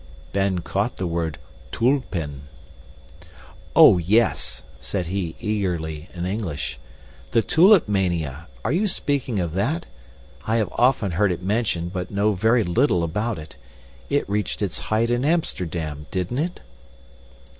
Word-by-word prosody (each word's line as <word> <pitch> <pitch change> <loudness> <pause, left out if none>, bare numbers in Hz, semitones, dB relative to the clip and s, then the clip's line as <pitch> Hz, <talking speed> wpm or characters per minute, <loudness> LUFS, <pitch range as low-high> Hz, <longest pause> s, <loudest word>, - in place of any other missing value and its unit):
Ben 95 -2 +1
caught 100 +7 -2
the 95 - -2
word 85 -3 -2 0.3
tulpen. 85 - -1 1.3
"Oh, 90 - +8
yes!" 110 +7 +1 0.2
said 95 -3 -3
he 90 -2 -3
eagerly, 90 -8 -2
in 85 0 -3
English, 95 -6 -3 0.5
"the 115 - +4
Tulip 180 - +6
Mania 85 -7 -1 0.2
are 110 - +1
you 190 +7 +2
speaking 140 - -1
of 85 -3 -2
that? 145 - -1 0.6
I 110 - +2
have 110 -5 +1
often 120 -6 +3
heard 95 +3 +2
it 90 0 -4
mentioned 95 -4 -1
but 90 -1 -3
know 105 +1 +1
very 110 +5 +3
little 90 0 +2
about 105 +7 -1
it. 75 -3 -10 0.5
It 145 - +1
reached 105 +1 -1
its 100 - -2
height 115 +2 +2
in 120 +1 +1
Amsterdam, 85 - -1
didn't 95 +8 -2
it?" 175 +4 -2
100 Hz, 135 wpm, -23 LUFS, 85-115 Hz, 1.3 s, Oh